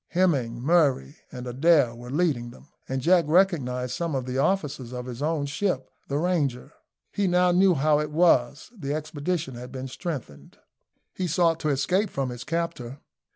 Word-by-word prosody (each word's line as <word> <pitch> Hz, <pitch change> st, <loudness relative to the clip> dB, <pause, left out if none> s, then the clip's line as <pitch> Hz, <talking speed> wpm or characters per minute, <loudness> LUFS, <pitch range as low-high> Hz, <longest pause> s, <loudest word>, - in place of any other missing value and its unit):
Hemming, 140 Hz, -10 st, +1 dB
Murray, 140 Hz, -, +2 dB
and 125 Hz, 0 st, -7 dB
Adair 135 Hz, 0 st, +3 dB
were 120 Hz, +1 st, -10 dB
leading 140 Hz, -5 st, 0 dB
them, 120 Hz, -, -16 dB, 0.2 s
and 130 Hz, -1 st, -2 dB
Jack 175 Hz, +1 st, +4 dB
recognised 140 Hz, -8 st, +2 dB
some 165 Hz, +1 st, -2 dB
of 130 Hz, -2 st, -2 dB
the 130 Hz, +1 st, -2 dB
officers 140 Hz, -7 st, -1 dB
of 125 Hz, 0 st, -5 dB
his 125 Hz, 0 st, -7 dB
own 155 Hz, -1 st, 0 dB
ship, 140 Hz, -2 st, -2 dB, 0.2 s
the 140 Hz, -, -1 dB
Ranger. 150 Hz, -6 st, -1 dB, 0.4 s
He 200 Hz, -1 st, 0 dB
now 180 Hz, 0 st, +3 dB
knew 185 Hz, 0 st, +4 dB
how 150 Hz, +1 st, +3 dB
it 150 Hz, 0 st, -2 dB
was 150 Hz, -, +2 dB
the 145 Hz, -7 st, -3 dB
expedition 155 Hz, -1 st, -3 dB
had 125 Hz, +1 st, -9 dB
been 130 Hz, 0 st, -6 dB
strengthened. 130 Hz, -, -7 dB, 0.6 s
He 185 Hz, -, -2 dB
sought 165 Hz, -1 st, +2 dB
to 155 Hz, -, -1 dB
escape 180 Hz, +9 st, +1 dB
from 135 Hz, -5 st, -3 dB
his 120 Hz, 0 st, -7 dB
captor. 145 Hz, -6 st, -3 dB
145 Hz, 170 wpm, -26 LUFS, 125-170 Hz, 0.6 s, Jack